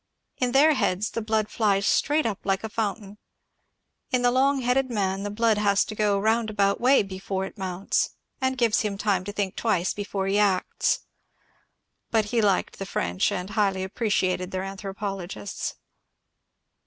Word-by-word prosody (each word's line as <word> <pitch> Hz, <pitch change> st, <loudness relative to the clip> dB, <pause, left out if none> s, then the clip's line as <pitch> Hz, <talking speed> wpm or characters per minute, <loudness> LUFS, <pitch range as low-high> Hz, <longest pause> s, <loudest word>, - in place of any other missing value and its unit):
In 250 Hz, -1 st, 0 dB
their 295 Hz, +4 st, +6 dB
heads 205 Hz, -5 st, 0 dB
the 230 Hz, -, -3 dB
blood 215 Hz, -1 st, 0 dB
flies 200 Hz, -3 st, +1 dB
straight 300 Hz, +6 st, +2 dB
up 215 Hz, -4 st, -1 dB
like 195 Hz, +1 st, 0 dB
a 220 Hz, -, -3 dB
foimtain. 205 Hz, -2 st, -3 dB, 0.9 s
In 250 Hz, -1 st, +1 dB
the 245 Hz, -, +4 dB
long 270 Hz, +2 st, +2 dB
headed 255 Hz, +2 st, +1 dB
man 195 Hz, -4 st, -1 dB
the 205 Hz, -, -3 dB
blood 220 Hz, 0 st, +2 dB
has 200 Hz, -1 st, +3 dB
to -, -, -6 dB
go 210 Hz, -1 st, +1 dB
a -, -, 0 dB
roundabout 215 Hz, -2 st, +1 dB
way 260 Hz, -1 st, +5 dB
before 190 Hz, 0 st, -4 dB
it -, -, -9 dB
mounts, 190 Hz, -2 st, -1 dB, 0.3 s
and 260 Hz, 0 st, 0 dB
gives 235 Hz, -3 st, +3 dB
him 205 Hz, -2 st, -2 dB
time 200 Hz, -3 st, +1 dB
to 205 Hz, -, -4 dB
think 200 Hz, -2 st, -2 dB
twice 190 Hz, -6 st, 0 dB
before 200 Hz, -1 st, -3 dB
he 195 Hz, +2 st, +1 dB
acts. 195 Hz, -3 st, +1 dB, 1.1 s
But 220 Hz, -2 st, +2 dB
he 235 Hz, -, +3 dB
liked 200 Hz, -3 st, +1 dB
the 195 Hz, -, -4 dB
French 90 Hz, -, 0 dB
and 190 Hz, 0 st, -4 dB
highly 200 Hz, -3 st, +1 dB
appreciated 190 Hz, -3 st, 0 dB
their 185 Hz, 0 st, -3 dB
anthropologists. 195 Hz, -1 st, -5 dB
205 Hz, 165 wpm, -25 LUFS, 195-225 Hz, 1.1 s, their